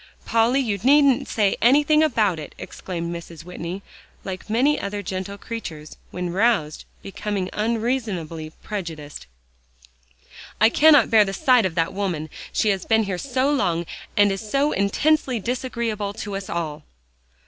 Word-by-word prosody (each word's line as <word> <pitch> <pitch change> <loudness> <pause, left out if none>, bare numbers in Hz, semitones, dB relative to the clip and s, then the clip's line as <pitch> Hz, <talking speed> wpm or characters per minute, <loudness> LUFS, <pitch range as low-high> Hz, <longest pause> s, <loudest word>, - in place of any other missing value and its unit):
"Polly, 230 +4 +3
you 215 -7 -1
needn't 275 +3 +4
say 205 -3 +1
anything 295 +5 +5
about 215 - +2
it," 150 - -9
exclaimed 170 -2 -6
Mrs. 170 -1 -9
Whitney, 180 +2 -6 0.4
like 190 +2 -7
many 265 +7 +2
other 205 0 -4
gentle 190 +2 -5
creatures, 165 -10 -7
when 180 -1 -4
roused, 195 -7 +1 0.2
becoming 195 -1 -4
unreasonably 215 -8 -2
prejudiced; 160 - -6 1.3
"I 220 +2 +6
cannot 295 0 +5
bear 220 -2 +7
the 195 -1 -4
sight 245 0 +4
of 170 - -9
that 165 -1 0
woman. 175 -6 -3 0.2
She 215 - +1
has 195 -3 0
been 220 -1 +2
here 190 -3 -3
so 265 +3 0
long, 175 -11 0 0.3
and 205 -1 +5
is 195 - -3
so 275 +7 0
intensely 255 +5 +1
disagreeable 230 -3 -3
to 205 -1 -6
us 195 -1 -6
all." 160 -3 -3
205 Hz, 145 wpm, -23 LUFS, 180-235 Hz, 1.3 s, bear